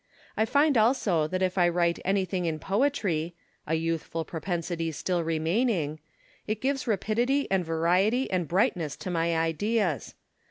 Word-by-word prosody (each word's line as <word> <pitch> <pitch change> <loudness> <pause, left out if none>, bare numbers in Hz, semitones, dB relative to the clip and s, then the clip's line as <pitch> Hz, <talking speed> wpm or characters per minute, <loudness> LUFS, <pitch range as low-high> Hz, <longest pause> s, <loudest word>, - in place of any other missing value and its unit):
I 220 - +2
find 285 +1 +3
also 210 - +2
that 185 +3 -1
if 185 0 0
I 175 -1 +5
Avrite 170 0 +1
anything 190 -2 0
in 160 -2 -1
poetry 190 - 0 0.3
(a 160 - +1
youthful 165 0 -2
propensity 165 -1 -3
still 175 +3 -1
remaining), 165 - 0 0.5
it 215 0 -1
gives 270 +1 -1
rapidity 240 +6 +1
and 190 -2 +2
variety 180 +10 +2
and 180 -3 0
brightness 170 -4 +1
to 185 - -6
my 165 -1 +1
ideas. 165 - 0
180 Hz, 145 wpm, -27 LUFS, 165-215 Hz, 0.5 s, I